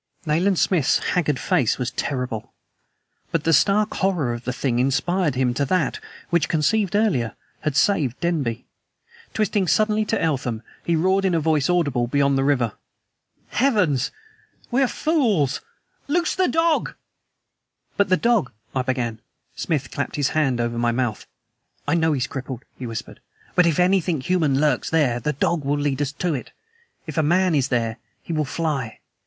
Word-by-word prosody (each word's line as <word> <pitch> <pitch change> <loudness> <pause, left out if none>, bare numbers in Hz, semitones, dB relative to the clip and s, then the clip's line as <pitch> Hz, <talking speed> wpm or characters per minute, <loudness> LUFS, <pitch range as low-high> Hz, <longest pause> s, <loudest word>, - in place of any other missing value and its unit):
Nayland 170 +5 +2
Smith's 165 -7 +3 0.2
haggard 150 -6 +1
face 120 -2 +1
was 125 -2 -2
terrible. 125 -6 -4 0.8
But 165 -2 0
the 165 - +2
stark 200 +9 +3
horror 175 -11 +1
of 120 0 -7
the 125 - -1
thing 125 -1 -1
inspired 145 +5 +1
him 125 -1 +1
to 140 +3 0
that, 185 +7 0 0.3
which 170 -1 +2
conceived 195 +6 +1
earlier, 150 - +1 0.2
had 150 -3 -2
saved 145 - +2
Denby. 140 -9 -1 0.7
Twisting 210 -3 +1
suddenly 215 +3 +2
to 225 - 0
Eltham, 130 -8 -1 0.2
he 170 - +1
roared 190 +4 +2
in 185 -3 +2
a - - +3
voice 155 -2 +1
audible 145 -9 +1
beyond 140 +2 +2
the 135 - +1
river: 125 -6 +1 0.8
"Heavens! 205 - +2 0.6
we 255 +3 +2
are 265 - +4
fools! 225 - +1 0.5
LOOSE 340 +3 +1
THE 370 -1 +2
DOG!" 325 0 +1 1.0
"But 200 -1 +2
the 185 - +4
dog 230 - +2
" 110 - -28
I 130 - +2
began. 125 -3 -2 0.4
Smith 140 -5 -2
clapped 140 - -3
his 145 -2 +1
hand 135 -6 +1
over 120 0 -1
my 120 0 +2
mouth. 120 -3 -2 0.6
"I 145 - +2
know 160 -2 +2
he's 130 -3 0
crippled," 130 -3 -6 0.2
he 125 - -5
whispered. 115 -1 -7 0.3
"But 180 -1 +4
if 165 -1 +1
anything 180 -3 +2
human 155 -4 +1
lurks 150 0 +1
there, 140 -7 +2
the 150 +6 -1
dog 155 +3 0
will 145 +1 0
lead 145 -1 -1
us 145 -1 -1
to 175 +2 -1
it. 130 - -5 0.5
If 155 -2 -3
a - - +5
MAN 175 +4 +2
is 140 -4 +2
there, 115 -3 -1 0.3
he 170 - -5
will 155 -1 0
fly! 140 -6 -2
150 Hz, 170 wpm, -23 LUFS, 130-180 Hz, 1.0 s, a